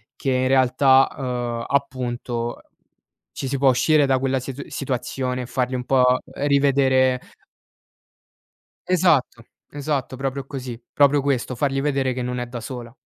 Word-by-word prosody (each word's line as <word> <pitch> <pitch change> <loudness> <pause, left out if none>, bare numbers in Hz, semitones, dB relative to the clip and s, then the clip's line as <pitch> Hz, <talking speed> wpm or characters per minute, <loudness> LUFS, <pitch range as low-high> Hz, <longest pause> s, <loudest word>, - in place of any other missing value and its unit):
che 135 - -2
in 130 0 +1
realtà, 130 +1 +4
uhm, 120 -3 -3
appunto 125 -3 -2 0.7
ci 135 - -5
si 140 0 -2
può 135 -1 +5
uscire 145 +3 +3
da 130 -1 +2
quella 135 0 0
situ 135 +2 -7
situazione 125 -1 -3
e 125 - -6
fargli 125 0 -2
un 125 -1 -3
po' 130 -1 +3 0.3
rivedere 135 -2 +2 1.7
Esatto, 165 -10 +2 0.3
esatto, 140 -2 -3
proprio 135 0 -3
così, 130 -4 -7
proprio 145 0 +4
questo, 130 -2 -1
fargli 135 +1 0
vedere 135 -3 0
che 125 - -4
non 125 0 -3
è 125 - -3
da 120 -1 -7
sola. 120 0 -8
130 Hz, 140 wpm, -22 LUFS, 125-140 Hz, 1.7 s, può